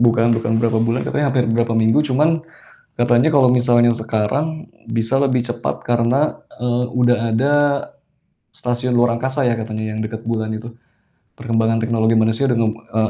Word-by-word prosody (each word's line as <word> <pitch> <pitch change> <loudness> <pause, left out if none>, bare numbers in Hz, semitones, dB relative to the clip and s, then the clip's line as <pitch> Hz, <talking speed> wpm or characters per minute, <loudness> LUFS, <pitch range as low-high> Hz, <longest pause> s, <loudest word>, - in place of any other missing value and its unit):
Bukan 115 -1 +3
bukan 115 0 0
berapa 115 0 +1
bulan 115 +2 0
katanya 145 -1 -1
hampir 125 -2 +1
berapa 115 0 0
minggu, 110 +5 +3
cuman 155 +5 +2 0.5
katanya 120 +5 +2
kalau 135 -3 +5
misalnya 120 -1 +3
sekarang 120 +8 -2 0.2
bisa 115 +3 -1
lebih 135 -2 +1
cepat 120 0 -4
karena, 120 +5 0 0.2
eee, 125 0 0
udah 125 -1 +3 0.2
ada 135 +6 +1 1.0
stasiun 125 0 -3
luar 120 -1 +3
angkasa 130 +3 -1
ya 120 - +2
katanya 110 -1 -5
yang 110 - -4
dekat 110 +1 -7
bulan 110 -1 -2
itu. 110 +2 -7 0.7
Perkembangan 115 -1 0
teknologi 115 0 +1
manusia 110 +5 +1
dengan, 115 -2 0
eee, 110 -1 -2
120 Hz, 155 wpm, -19 LUFS, 115-125 Hz, 1.0 s, kalau